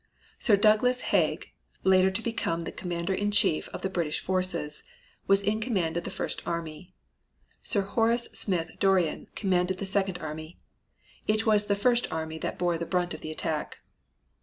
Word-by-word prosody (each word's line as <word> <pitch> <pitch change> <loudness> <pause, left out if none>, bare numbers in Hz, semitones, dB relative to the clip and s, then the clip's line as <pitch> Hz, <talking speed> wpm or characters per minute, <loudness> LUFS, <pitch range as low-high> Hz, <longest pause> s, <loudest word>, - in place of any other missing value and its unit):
Sir 210 -5 +4
Douglas 215 +5 +4
Haig, - - +1 0.3
later 190 0 +5
to 190 +4 -2
become 170 -8 -2
the - - -5
commander 175 +1 -3
in 205 +2 0
chief 190 -5 +3
of - - -8
the - - +1
British 165 -5 -1
forces, 180 -5 -2 0.5
was 195 0 +4
in 210 +2 0
command 190 -9 -1
of 170 - -2
the - - -3
first - - -3
army. 170 +2 -5 0.7
Sir 205 - +2
Horace 230 +4 +1
Smith 175 -4 +1
Dorrien 190 -5 +2
commanded 185 -2 +1
the 200 - -4
second 195 -2 0
army. 155 0 -7 0.7
It 215 +1 +1
was 210 -2 +4
the 200 - +2
first 240 +4 +2
army 160 0 -4
that - - -4
bore 175 -2 0
the 170 - -4
brunt 180 -1 0
of 155 - -8
the 155 - -6
attack. 155 -1 -3
185 Hz, 170 wpm, -28 LUFS, 170-205 Hz, 0.7 s, later